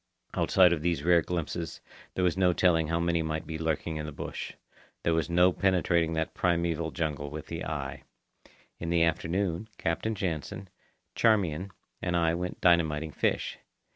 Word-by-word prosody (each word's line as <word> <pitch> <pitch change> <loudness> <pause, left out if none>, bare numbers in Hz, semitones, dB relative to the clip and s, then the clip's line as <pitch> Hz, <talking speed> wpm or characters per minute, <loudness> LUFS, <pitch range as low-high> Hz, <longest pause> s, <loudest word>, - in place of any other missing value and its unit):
Outside 90 -2 +5
of 80 - -2
these 85 -3 0
rare 85 0 +5
glimpses, 85 -1 -3 0.4
there 90 - 0
was 90 - +2
no 90 -1 +3
telling 80 -2 +3
how 85 +1 0
many 85 -1 +1
might 80 0 -3
be 80 -1 -5
lurking 80 0 -1
in 75 0 -4
the - - -5
bush. - - -6 0.5
There 85 - +2
was 80 +1 0
no 90 +1 +5
penetrating 85 -4 +2
that 80 0 -1
primeval 85 -2 0
jungle 75 -3 -3
with 75 +1 -7
the - - -5
eye. - - -4 0.8
In 85 - -4
the 85 -1 +3
afternoon, 85 +4 0
Captain 110 +7 -1
Jansen, 95 +2 -4 0.4
Charmian, 95 -6 +2 0.3
and 90 -1 0
I 85 -1 +3
went 90 +1 -4
dynamiting 80 -3 +3
fish. - - -1
85 Hz, 165 wpm, -29 LUFS, 80-90 Hz, 0.8 s, Outside